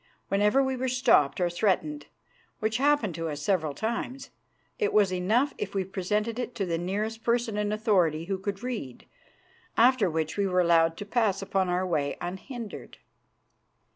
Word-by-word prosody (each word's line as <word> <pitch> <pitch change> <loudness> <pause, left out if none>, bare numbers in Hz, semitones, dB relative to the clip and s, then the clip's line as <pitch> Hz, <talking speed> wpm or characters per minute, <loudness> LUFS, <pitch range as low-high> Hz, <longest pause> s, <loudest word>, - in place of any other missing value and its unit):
Whenever 210 +7 +3
we 265 0 -1
were 260 +1 -2
stopped 245 - +3
or 180 - +2
threatened, 205 - 0 0.5
which 220 +1 -1
happened 275 - +2
to 165 0 -3
us 145 -1 -4
several 155 -3 0
times, 245 +4 -4 0.5
it 425 - +1
was 200 -3 +4
enough 220 +10 +1
if 200 -1 -4
we 195 - +1
presented 210 +5 -2
it 245 -1 -4
to 200 -4 -1
the 165 -2 -1
nearest 210 +5 -3
person 235 -1 +1
in 210 0 -1
authority 180 -7 +1
who 190 +1 -2
could 200 +2 -4
read, 225 - -5 0.7
after 235 -4 +5
which 160 +1 -2
we 200 -1 +1
were 180 -1 +2
allowed 165 -1 +3
to 205 - -6
pass 205 -3 +1
upon 190 -1 0
our 180 +1 0
way 150 -5 -1
unhindered. 210 +6 -7
200 Hz, 170 wpm, -27 LUFS, 180-235 Hz, 0.7 s, after